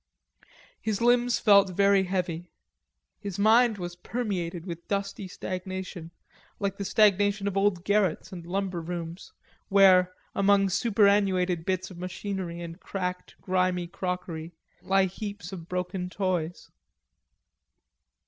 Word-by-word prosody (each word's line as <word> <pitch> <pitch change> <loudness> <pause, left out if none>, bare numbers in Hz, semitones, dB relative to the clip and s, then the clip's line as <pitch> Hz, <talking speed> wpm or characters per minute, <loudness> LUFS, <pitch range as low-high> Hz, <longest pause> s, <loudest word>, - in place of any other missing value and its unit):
His 220 -3 -1
limbs 240 0 +3
felt 200 -2 +5
very 200 +1 +3
heavy; 180 -2 -2 0.7
his 200 -4 -5
mind 220 +2 +5
was 175 -2 -5
permeated 180 -5 -3
with 170 -2 -7
dusty 200 -1 -3
stagnation 185 -2 -6 0.5
like 200 -1 -2
the 200 - -4
stagnation 205 0 +3
of 200 - -2
old 195 -3 +2
garrets 200 -4 +1
and 175 -3 -7
lumber 185 0 -2
rooms, 170 +2 -6 0.4
where, 185 -2 +6 0.2
among 200 0 +3
superannuated 195 -5 +2
bits 185 0 -1
of 175 - -10
machinery 180 -1 -4
and 170 +1 -8
cracked 180 -2 -4
grimy 185 -1 +1
crockery, 175 -2 -5 0.3
lie 195 0 +3
heaps 200 -1 -6
of 170 -3 -8
broken 180 0 -3
toys. 180 -3 -2
185 Hz, 120 wpm, -27 LUFS, 175-200 Hz, 0.7 s, where